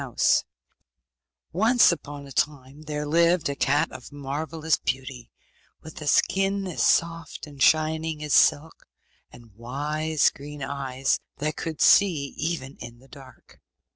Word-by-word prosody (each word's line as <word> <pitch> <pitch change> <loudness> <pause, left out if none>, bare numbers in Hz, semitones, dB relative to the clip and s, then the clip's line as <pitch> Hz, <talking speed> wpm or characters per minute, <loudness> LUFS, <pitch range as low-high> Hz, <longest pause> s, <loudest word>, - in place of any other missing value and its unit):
] 65 - -55
Once 225 +6 +4
upon 145 -3 -7
a 140 - -12
time 140 +1 -3
there 150 -1 -4
lived 170 +2 +2
a 140 - -3
cat 145 +1 +1
of - - -11
marvellous 155 +3 -2
beauty, 130 -2 -4 0.5
with 160 0 -11
a 150 - -6
skin 195 +5 +1
as 180 -4 -4
soft 165 0 0
and 145 -3 -13
shining 155 0 +2
as 150 - -2
silk, 160 +3 +2 0.4
and 115 -3 -16
wise 145 +7 -1
green 145 0 -9
eyes, 135 -1 -2 0.2
that 150 +2 -2
could 160 -2 -5
see 160 -9 +4
even 155 -5 -4
in 120 0 -10
the 130 +3 -20
dark. 135 -3 -16
150 Hz, 140 wpm, -25 LUFS, 135-160 Hz, 0.5 s, Once